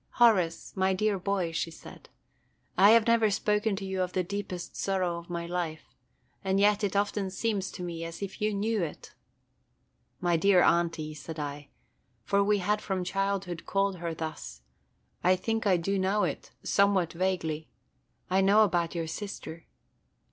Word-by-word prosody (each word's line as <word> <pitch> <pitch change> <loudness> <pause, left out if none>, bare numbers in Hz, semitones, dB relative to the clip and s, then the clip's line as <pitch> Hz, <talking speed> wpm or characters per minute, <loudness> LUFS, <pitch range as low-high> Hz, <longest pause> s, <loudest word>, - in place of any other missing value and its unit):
"Horace, 190 -9 +3
my 190 0 +2
dear 205 0 +1
boy," 185 -3 -1
she 165 +1 -2
said, 165 - -13 0.7
"I 195 +3 +7
have 225 0 +6
never 230 -2 +4
spoken 210 +1 +1
to 195 0 -5
you 190 -1 -2
of 180 0 -2
the 185 - +1
deepest 190 -1 -5
sorrow 185 -3 -1
of 170 - -14
my 170 -1 -3
life, 170 -2 -4 0.5
and 190 0 +1
yet 205 +1 +3
it 200 -1 0
often 200 -1 0
seems 195 0 -1
to 180 - -7
me 170 -1 -5
as 165 +3 -6
if 195 +1 -7
you 215 0 +2
knew 210 +1 0
it." 165 -3 -6 1.1
"My 175 -2 +2
dear 185 +1 +5
Aunty," 165 -2 +1
said 150 +2 -8
I, 145 -1 -5 0.6
for 200 0 +2
we 210 +1 +3
had 210 +2 0
from 190 -2 -2
childhood 195 -2 -2
called 195 -1 +1
her 170 -1 -4
thus, 65 - -6 0.6
"I 185 +1 +5
think 225 +3 -1
I 185 -2 +4
do 195 +4 -1
know 195 +3 +1
it, - - -3
– - - -41
somewhat 200 -4 +2
vaguely. 165 -4 -2 0.6
I 190 +1 +2
know 200 +3 +6
about 175 -4 0
your 165 -1 -1
sister." 165 -2 -7
190 Hz, 170 wpm, -29 LUFS, 170-200 Hz, 1.1 s, I